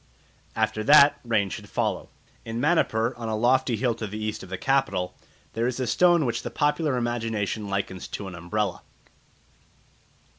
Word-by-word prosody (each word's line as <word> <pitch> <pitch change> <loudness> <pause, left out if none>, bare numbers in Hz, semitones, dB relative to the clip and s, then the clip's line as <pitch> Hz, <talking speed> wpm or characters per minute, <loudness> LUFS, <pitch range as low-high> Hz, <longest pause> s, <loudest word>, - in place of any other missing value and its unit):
After 110 -1 0
that 145 0 +7
rain 110 -5 0
should - - -7
follow. - - -2 0.3
In 115 0 -5
Manipur, 125 -6 +2
on 115 -2 -5
a 110 - -1
lofty 125 +2 +2
hill 120 +2 0
to 110 -1 -5
the 105 +2 -6
east 110 0 -3
of 95 - -11
the 95 - -4
capital, 100 -10 0 0.4
there 115 +1 0
is 125 0 -3
a 130 - 0
stone 175 +6 +4
which 120 - -1
the - - -5
popular 150 -2 0
imagination 115 -3 -2
likens 95 -2 -3
to 100 - -6
an 95 - -8
umbrella. 95 +5 -2
115 Hz, 170 wpm, -25 LUFS, 105-130 Hz, 0.4 s, that